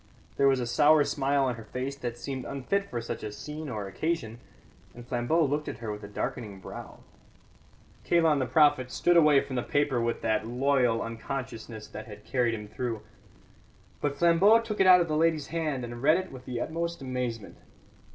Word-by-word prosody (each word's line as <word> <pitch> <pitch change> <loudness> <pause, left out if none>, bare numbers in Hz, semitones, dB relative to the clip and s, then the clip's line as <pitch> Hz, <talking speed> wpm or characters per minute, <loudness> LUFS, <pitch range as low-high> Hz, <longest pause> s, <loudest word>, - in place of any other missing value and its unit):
There 140 - +3
was 135 -1 +3
a 125 - -1
sour 150 +5 +5
smile 140 -1 +1
on 125 -2 -1
her 115 - -9
face 130 +5 -4
that 120 -3 -5
seemed 130 +1 -5
unfit 195 +11 -2
for 120 - -3
such 115 0 -5
a 105 - -5
scene 150 +6 -7
or 105 -4 -4
occasion, 115 - -3 0.6
and 120 0 -10
Flambeau 125 +7 +1
looked 145 +2 -1
at - - -5
her 110 -3 -5
with 105 0 -7
a - - -6
darkening 105 0 -5
brow. - - -10 1.0
Kalon 165 -4 +3
the 130 - 0
prophet 145 -2 +4
stood 175 +9 +2
away 150 -4 +6
from 130 - -5
the - - +1
paper 145 -2 0
with 115 0 -2
that 110 0 0
loyal 125 -2 +2
unconsciousness 115 -2 -6
that 110 +2 -8
had 105 -1 -11
carried 120 -3 +1
him 105 -1 -8
through. 115 -1 -4 1.0
But 145 -1 -1
Flambeau 175 +7 +5
took 220 -2 -5
it 190 - +5
out 180 -1 +8
of 170 - 0
the 155 - -1
lady's 160 -1 +1
hand, 155 -6 -2
and 120 0 -8
read 155 +5 +5
it 185 0 -5
with 130 -1 -11
the 125 -2 -4
utmost 170 -1 -3
amazement. 125 -5 -4
130 Hz, 195 wpm, -28 LUFS, 115-155 Hz, 1.0 s, out